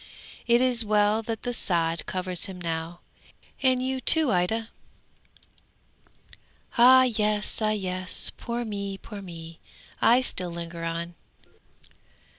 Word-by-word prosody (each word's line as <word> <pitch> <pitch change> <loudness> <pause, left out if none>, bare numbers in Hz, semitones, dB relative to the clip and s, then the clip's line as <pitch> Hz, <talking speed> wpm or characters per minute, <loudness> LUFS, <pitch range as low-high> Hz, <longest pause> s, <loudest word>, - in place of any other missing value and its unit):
It 235 +1 +4
is 250 -2 +4
well 210 0 +2
that 225 -1 -6
the 245 - -3
sod 165 -6 +1
covers 185 -1 -1
him 190 -2 -9
now, 165 0 -5 0.6
and 255 -1 +2
you 260 0 -2
too, 315 -2 +3
Ida! 220 +6 -1 2.1
Ah 255 +2 +7
yes! 215 -3 0
ah 215 - +1
yes! 185 -3 +1
Poor 240 0 -5
me! 200 -2 -5
poor 205 0 -10
me! 165 -3 -10 0.4
I 245 +3 +5
still 185 -8 -3
linger 170 0 -7
on. 170 +1 -4
205 Hz, 120 wpm, -25 LUFS, 175-235 Hz, 2.1 s, Ah